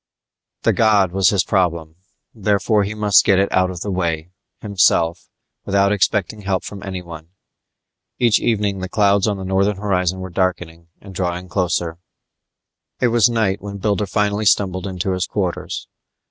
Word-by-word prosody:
The - - +3
god 105 -5 +3
was 95 0 +3
his 100 -3 +2
problem; 85 -5 -1 0.4
therefore 105 0 +1
he 105 +2 -4
must 105 -2 +4
get 95 - +3
it 100 +1 +1
out 95 0 +2
of 90 -2 -7
the 100 - -3
way, 85 -2 -2 0.3
himself, 85 -4 +1 0.3
without 100 0 +2
expecting 105 +1 0
help 95 -2 -1
from 100 -1 -8
anyone. 85 -4 -7 0.9
Each 120 -3 +3
evening 105 -4 0
the 95 0 -5
clouds 100 -1 +2
on 105 -2 -1
the 95 - -6
northern 95 +2 +1
horizon 95 -2 -1
were 95 0 -7
darkening 85 -2 -2
and 100 -1 -12
drawing 90 0 -3
closer. 85 -2 -1 1.0
It 125 - +2
was 120 +1 +4
night 110 -5 0
when 100 0 -7
Builder 100 0 -1
finally 105 +1 0
stumbled 95 -2 +1
into 95 0 -3
his 90 0 -1
quarters. 95 -4 -3
95 Hz, 160 wpm, -19 LUFS, 90-105 Hz, 1.0 s, must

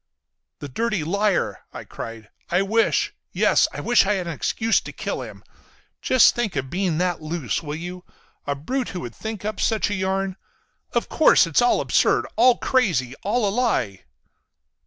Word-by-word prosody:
"The 145 - -7
dirty 215 - -1
liar!" 200 +4 0
I - - -8
cried. 115 -2 -9 0.2
"I 180 +3 +2
wish—yes—I 225 +3 +1
wish 240 -4 +3
I 210 - +3
had 185 -2 -3
an 170 - -4
excuse 225 - 0
to - - -8
kill - - -4
him. - - -10 0.6
Just 255 -3 +5
think 240 -7 -2
of 135 -1 -1
that 130 - -14
being 180 -3 0
loose, 165 - -2
will 150 -2 -5
you? 180 +2 -7 0.4
A 145 - 0
brute 250 - -3
who - - -4
would 120 -2 -7
think 220 -2 -6
up 215 - -3
such 220 -2 +1
a - - 0
yarn! 190 0 -2 0.6
Of - - 0
course 315 - +5
it's 165 +3 +2
all 245 - +3
absurd. - - +2
All 245 +2 +5
crazy. 170 - +1
All 215 +1 0
a 195 - -1
lie." 205 - -1
190 Hz, 170 wpm, -23 LUFS, 155-225 Hz, 0.6 s, Just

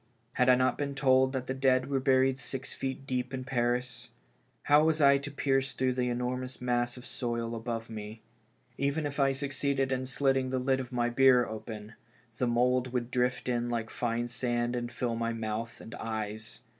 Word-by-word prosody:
Had 125 0 +3
I 125 - +8
not 130 0 +1
been 140 -1 -2
told 130 -1 +4
that 130 -2 -3
the 130 - -2
dead 130 -1 +2
were 140 -1 0
buried 130 0 +3
six 135 -1 -5
feet 135 0 -4
deep 125 0 -2
in 130 - -4
Paris? 125 -1 -1 0.5
How 145 +1 +5
was 160 0 +2
I 140 -1 +6
to 140 +1 -6
pierce 135 -1 0
through 130 0 +1
the 125 -1 0
enormous 125 +1 -3
mass 120 0 0
of 125 - -10
soil 120 -2 -3
above 115 0 -4
me? 110 0 -8 0.6
Even 140 +3 0
if 145 0 -4
I 135 -1 +4
succeeded 135 0 -1
in 130 0 -1
slitting 135 0 +1
the 130 - -1
lid 130 +1 +1
of 130 -1 -6
my 120 -1 +1
bier 125 0 +5
open, 110 0 -7 0.5
the 125 - +2
mould 125 +1 +2
would 125 -1 -2
drift 125 0 0
in 120 -1 0
like 115 -2 -2
fine 120 0 -1
sand 120 0 -1
and 120 0 -3
fill 120 -1 -2
my 115 0 -1
mouth 115 +1 -4
and 115 - -10
eyes. 110 0 -5
125 Hz, 195 wpm, -30 LUFS, 120-135 Hz, 0.6 s, I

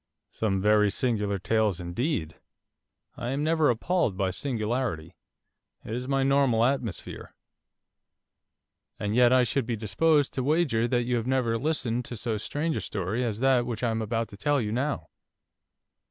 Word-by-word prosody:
'Some 100 -3 -1
very 105 +1 +4
singular 105 -2 0
tales 105 -1 +1
indeed. 85 - -2 0.8
I 120 - -4
am 140 +3 -1
never 160 -1 +3
appalled 120 - 0
by 95 -1 0
singularity. 110 - -3 0.7
It 110 - -5
is 125 +2 -4
my 135 0 +1
normal 135 -4 +3
atmosphere.' 120 -8 -3 1.6
'And 105 0 -2
yet 125 +1 +5
I 130 -1 +5
should 125 0 -1
be 120 - -1
disposed 145 +8 +2
to 130 - -2
wager 140 -6 +2
that 120 0 +1
you 120 0 0
have 115 +1 -3
never 130 -3 +1
listened 125 -3 -1
to 120 - -7
so 110 -1 -2
strange 150 +8 -2
a - - -2
story 100 +5 -2
as 115 -2 -3
that 130 -2 +3
which 115 -1 -4
I 120 - +2
am 110 0 -1
about 115 +1 -2
to 100 - -12
tell 145 +5 +1
you 105 -4 -2
now. 135 +5 -2
120 Hz, 165 wpm, -27 LUFS, 105-135 Hz, 1.6 s, yet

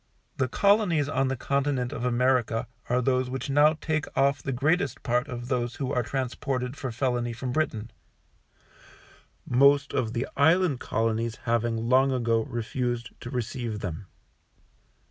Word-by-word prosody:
The 130 - +1
Colonies 200 - +3
on 135 -2 +1
the 135 - -1
Continent 135 -1 -1
of 115 - -5
America 125 -1 +1 0.2
are 125 +1 +2
those 130 0 +1
which 130 +2 -4
now 145 +2 +5
take 155 -1 -1
off 140 0 +3
the 135 - -3
greatest 155 +9 0
part 125 -1 +1
of 120 -1 -6
those 120 -2 -1
who 135 -2 -3
are 125 - +2
transported 130 +1 -3
for 135 -3 -4
felony 120 -1 -1
from 125 +2 -4
Britain, 120 -6 -2 1.5
most 140 +3 +4
of 115 -2 -1
the 120 +2 -2
Island 160 -1 +3
Colonies 115 0 -1
having 115 -1 0
long 130 +2 +4
ago 115 -3 +1
refused 120 +1 -3
to 120 - -7
receive 120 -3 -3
them. 90 +1 -5
125 Hz, 145 wpm, -27 LUFS, 120-140 Hz, 1.5 s, now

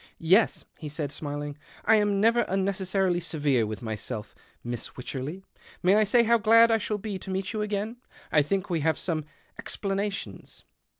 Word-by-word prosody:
" - - -33
Yes," 185 +7 +3
he 155 - -6
said 145 -1 -4
smiling, 145 -1 -5
" - - -21
I 220 - +6
am 205 -1 +2
never 230 +3 +4
mnecessarily 190 -1 0
severe 145 -9 +1
with 110 +1 -6
myself, 110 -1 -5 0.3
Miss 120 -1 -3
Vycherley. 140 +8 -6 0.4
May 185 +2 +5
I 215 0 +4
say 235 +4 +4
how 235 0 +4
glad 230 +1 +6
I 225 - +3
shall 210 0 -2
be 205 -2 -5
meet 190 +2 -2
you 215 - -2
again? 210 +2 -2 0.3
I 150 - +5
think 185 +6 -1
we 170 -3 0
have 160 +1 +1
some 165 -4 -1
—some - - -15 0.3
explanations." 200 0 -4
190 Hz, 180 wpm, -27 LUFS, 150-210 Hz, 0.4 s, I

